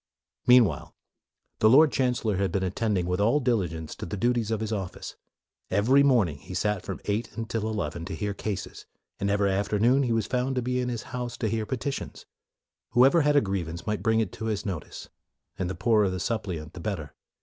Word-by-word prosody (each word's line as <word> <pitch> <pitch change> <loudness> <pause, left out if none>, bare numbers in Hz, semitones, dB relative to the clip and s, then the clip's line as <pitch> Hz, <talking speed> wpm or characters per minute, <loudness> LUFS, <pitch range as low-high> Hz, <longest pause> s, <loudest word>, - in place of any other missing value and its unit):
Meanwhile, 125 -4 +4 0.6
the 110 - +5
Lord 145 +5 +7
Chancellor 125 -6 0
had 100 0 0
been 95 - 0
attending, 95 0 0
with 90 +2 -1
all 115 +8 +3
diligence, 90 - -1
to - - -5
the 105 - -4
duties 120 +1 +1
of 110 -2 0
his 110 -1 -3
office. 95 -5 -5 0.5
Every 115 +9 +4
morning 115 - +3
he 90 - -9
sat 105 +1 0
from - - -6
eight 105 +2 -1
until 115 -1 -2
eleven 85 -6 -3
to 95 - -5
hear 105 -1 -2
cases, 100 -2 -5 0.3
and 100 - 0
every 100 -1 +2
afternoon 105 +7 +2
he 125 -3 0
was 115 -2 +1
to - - -11
be - - -1
found 130 +1 -1
in 125 0 -1
his 120 -2 -4
house 125 -1 -4
to 110 - -1
hear 110 -1 -2
petitions. 135 +2 -4 0.7
Whoever 135 +7 +6
had 150 0 +2
a 145 - +6
grievance 85 -4 -3
might 105 -1 -2
bring 110 -1 +2
it 110 -5 -1
to 110 - -7
his 110 -2 -2
notice, 90 -7 -6 0.5
and 90 -2 -1
the 95 - -4
poorer 105 -1 +3
the 90 0 -3
suppliant 85 -5 -3
the - - -9
better. 85 -7 -4
105 Hz, 200 wpm, -27 LUFS, 95-120 Hz, 0.7 s, Lord